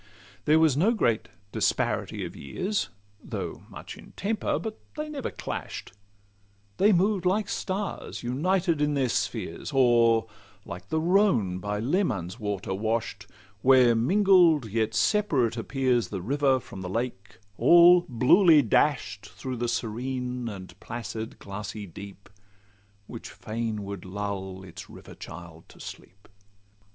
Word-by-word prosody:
There 155 +1 +5
was 160 -4 +4
no 205 +11 +3
great 115 - +1 0.2
disparity - - -1
of - - -8
years, 185 - -3 0.3
Though - - -6
much - - -9
in - - -15
temper; 210 +2 -1
but 220 -1 -6 0.2
they 305 0 -4
never 285 -3 -4
clash'd: - - -6 0.9
They 205 +2 +5
moved 190 +1 +2
like 195 +3 +1
stars 200 -5 -4
united 165 +6 +1
in 150 0 +1
their 135 -3 +1
spheres, 105 - -3
Or 120 -4 +4 0.4
like 90 +2 -9
the 160 - +1
Rhone 160 - +2
by 105 +2 -3
Leman's 115 - -1
waters 100 -3 -3
wash'd, 110 -2 -2 0.3
Where 130 -2 +6
mingled 175 - +4
and 105 - -10
yet 110 -1 0
separate 140 - +2
appears 125 0 0
The 95 -4 -5
river 135 +3 +2
from 100 -5 -10
the 90 - -5
lake, 100 -2 -4 0.2
all 175 +7 +8
bluely 150 - +6
dash'd 110 -4 +1
Through 115 +5 -6
the 120 +1 -1
serene 125 +1 -3
and 95 -3 -10
placid 115 -1 -6
glassy 100 +1 -7
deep, 100 +2 -11 0.8
Which - - -9
fain 110 -1 -4
would 100 -2 -6
lull 95 -1 -5
its 90 -3 -10
river - - -12
child 80 -1 -11
to - - -17
sleep. 100 +3 -11
120 Hz, 135 wpm, -27 LUFS, 105-160 Hz, 0.9 s, all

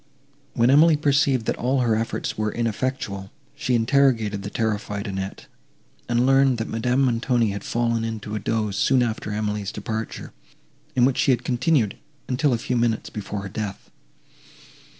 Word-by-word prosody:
When 120 +1 +4
Emily 155 +2 +6
perceived, 140 -4 +2
that - - -1
all 130 +2 +1
her 115 -3 +2
efforts 115 +1 -2
were 105 0 -1
ineffectual, 115 -4 -3 0.2
she 140 -4 -1
interrogated 115 -4 +2
the 100 - -5
terrified 105 -2 -2
Annette, 95 -1 -5 0.6
and 120 +1 +2
learned, 135 -1 +4
that 115 - -3
Madame 125 +4 0
Montoni 120 -2 +1
had 100 0 -5
fallen 115 -1 0
into 110 -2 -5
a 110 - -1
doze 105 -1 -1
soon 130 +4 +3
after 110 -2 -3
Emily's 105 -1 -2
departure, 110 +2 -5 0.6
in 125 -1 +5
which 135 0 +1
she - - +2
had 125 -2 +2
continued, 125 -3 +1 0.3
until 135 +3 +1
a 120 - +2
few 125 +2 -2
minutes 115 -1 0
before 105 -1 -5
her - - -5
death. 100 0 -6
115 Hz, 160 wpm, -23 LUFS, 105-130 Hz, 0.6 s, Emily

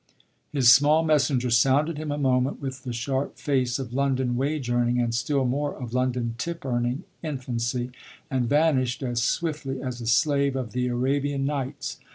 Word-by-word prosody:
His 130 -4 +7
small 150 +4 +4
messenger 135 -5 +2
sounded 140 +7 +3
him 155 -1 -4
a 145 - -2
moment 130 -1 +1
with 130 -2 -5
the 125 - -3
sharp 130 +3 -2
face 130 -4 0
of 130 -3 -6
London 130 -2 0
wage 140 +1 -1
earning, 120 0 +1
and 120 -1 0
still 135 +3 0
more 145 +4 -1
of 120 -2 -6
London 125 -2 0
tip 170 +2 -4
earning, 120 +4 -1 0.2
infancy, 125 -4 -3 0.4
and 125 -3 -1
vanished 145 -3 +2
as 120 -2 -1
swiftly 145 0 -1
as 125 -2 -5
a 115 - -5
slave 140 +2 +2
of 130 -4 -3
the 125 0 -1
Arabian 135 +3 0
Nights. 140 -1 -3
130 Hz, 170 wpm, -25 LUFS, 125-145 Hz, 0.4 s, His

